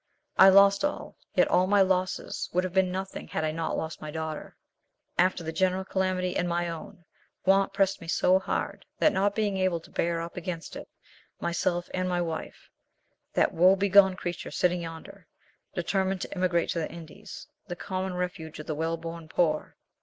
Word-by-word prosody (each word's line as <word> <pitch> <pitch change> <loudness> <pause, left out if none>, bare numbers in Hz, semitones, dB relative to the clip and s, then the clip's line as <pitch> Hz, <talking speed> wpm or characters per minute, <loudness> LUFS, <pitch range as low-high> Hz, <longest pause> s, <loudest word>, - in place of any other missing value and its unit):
I 195 - +9
lost 200 +2 +6
all; 290 - -2 0.2
yet - - +5
all 180 +1 +3
my 200 0 +5
losses 185 -1 -1
would 180 +1 +2
have 185 -1 -4
been 190 -1 +3
nothing 190 +1 -5
had - - -2
I 155 - 0
not 165 +1 -2
lost 160 0 -5
my 155 - -6
daughter. 160 0 -5 0.6
After 180 -1 +3
the 160 - -3
general 185 +2 +1
calamity 185 -1 -1
and 175 - 0
my 175 0 0
own, 165 +1 -9 0.4
want 195 +1 +4
pressed 195 -1 +1
me 165 - -9
so 185 +3 +3
hard, - - -3
that 310 - +4
not 200 +1 +1
being 205 -3 0
able 185 -3 +1
to - - -17
bear 170 0 0
up 170 +1 -6
against 170 -1 -5
it, - - -8 0.5
myself 175 +1 -1
and 185 0 -1
my 180 -1 0
wife—that 165 -2 -4
woe 185 +3 +6
begone 195 -1 +5
creature 175 -2 -5
sitting 180 -1 +1
yonder—determined 190 +1 -5
to - - -5
emigrate 180 -2 +1
to 170 - -1
the 160 - -3
Indies, 165 -1 -10 0.2
the 175 - -4
common 185 0 -4
refuge 180 -3 -4
of 150 - -8
the 155 - -2
well 165 +2 -1
born 165 0 -7
poor. 155 -2 0
180 Hz, 180 wpm, -28 LUFS, 165-190 Hz, 0.6 s, I